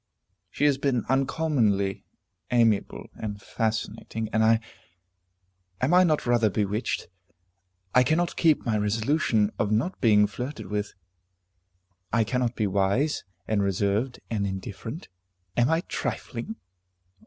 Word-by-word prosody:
She - - -4
has 140 -2 +3
been 135 -5 0
uncommonly 130 -8 +1 0.4
amiable 115 -4 +2
and 105 -2 -5
fascinating, 110 0 -3
and 110 0 +3
I 110 0 +5 1.2
am 135 +7 +1
I 180 +1 +7
not 155 -4 +1
rather 120 -3 +3
bewitched? 105 +3 -1 0.9
I 125 - +6
cannot 160 +6 +1
keep 160 -3 +3
my 110 -3 +1
resolution 110 0 +1
of 105 0 +1
not 130 - 0
being 105 -3 +5
flirted 125 +8 -5
with. 105 0 -3 1.2
I 115 +1 +3
cannot 125 +1 -1
be 110 - 0
wise, 100 +10 +1 0.2
and 110 -2 +1
reserved, 100 +6 0
and 100 -3 0
indifferent. 100 - -6 0.5
Am 120 +1 +3
I 160 +1 +2
trifling? 130 - -4
115 Hz, 120 wpm, -26 LUFS, 105-135 Hz, 1.2 s, I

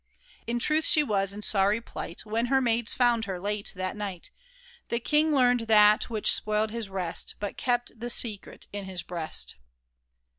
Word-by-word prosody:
In 235 +1 -1
truth 305 +6 +1
she 305 - +5
was 195 -6 0
in 210 +1 -6
sorry 200 +2 +2
plight 185 -5 -7
When 225 +3 -1
her 270 +1 +3
maids 235 -2 +1
found 240 -3 +2
her 190 -2 -4
late 205 +2 -2
that 185 0 -3
night, 200 -4 -6 0.6
The 235 - 0
king 300 +5 +2
learned 245 -4 +3
that 210 +1 +5
which 220 -3 +3
spoiled 215 0 0
his 225 -3 -4
rest, 185 -3 -2
But 205 -1 -4
kept 245 -2 -1
the 240 +1 -4
secret 220 -4 -2
in 205 -1 -4
his 185 -2 -4
breast 165 -3 -3
215 Hz, 175 wpm, -27 LUFS, 200-240 Hz, 0.6 s, she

